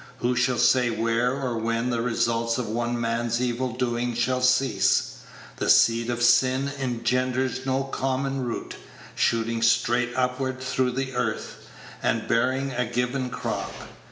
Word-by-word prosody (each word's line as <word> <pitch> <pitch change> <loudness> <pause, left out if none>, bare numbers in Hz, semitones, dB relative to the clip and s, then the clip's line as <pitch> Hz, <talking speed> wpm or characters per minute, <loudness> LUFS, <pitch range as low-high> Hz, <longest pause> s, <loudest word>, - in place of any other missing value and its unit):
Who 125 0 0
shall 125 0 +1
say 125 +1 +4
where 115 +2 +1
or 130 -4 -2
when 115 +2 -1
the 115 -1 0
results 115 -1 0
of 125 -3 -3
one 120 +2 -2
man's 115 0 -1
evil 125 +1 -1
doing 120 -1 -1
shall 125 +2 0
cease? 125 -5 +2 0.4
The - - -1
seed 115 +1 +4
of 120 0 -1
sin 130 +3 +3
engenders 130 +1 -1
no 135 +1 +1
common 135 0 -2
root, 120 -2 -5 0.4
shooting 115 0 0
straight 120 +1 +2
upward 130 +1 -1
through 130 -1 -1
the 135 0 -3
earth, 120 -3 -3 0.3
and - - 0
bearing 130 +3 +1
a 125 0 -1
given 125 +2 -1
crop. - - -4
125 Hz, 145 wpm, -25 LUFS, 115-130 Hz, 0.4 s, say